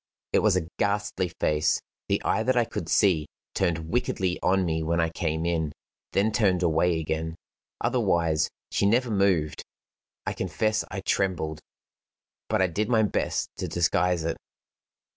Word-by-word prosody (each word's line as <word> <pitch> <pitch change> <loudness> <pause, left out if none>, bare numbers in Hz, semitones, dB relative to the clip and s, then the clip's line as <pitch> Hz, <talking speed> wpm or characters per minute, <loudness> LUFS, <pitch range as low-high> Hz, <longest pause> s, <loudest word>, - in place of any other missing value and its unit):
It - - +5
was 105 -3 +3
a 85 -3 -2
ghastly 100 -2 0
face. 75 -2 +1 0.3
The - - +2
eye 110 - +2
that 130 +2 +1
I 120 - +4
could 115 - -5
see 85 -8 +3 0.3
turned 85 -3 -1
wickedly 95 -7 0
on 95 0 +2
me 80 -1 0
when 85 +2 0
I 80 0 +2
came 80 -1 -2
in 80 -3 0 0.4
then 105 +3 +2
turned 95 -4 +2
away 80 0 +2
again. 80 +1 -3 0.4
Otherwise, 80 -2 +1 0.2
she 100 - +2
never 120 +3 +2
moved. 95 -7 +1 0.6
I - - -1
confess 110 +5 0
I 95 +1 -4
trembled, 85 -6 -1 0.9
but 95 - +2
I - - +5
did 105 +5 -1
my 110 -3 +4
best 105 - 0
to - - -3
disguise 85 0 +1
it. 80 0 -2
90 Hz, 155 wpm, -26 LUFS, 80-100 Hz, 0.9 s, It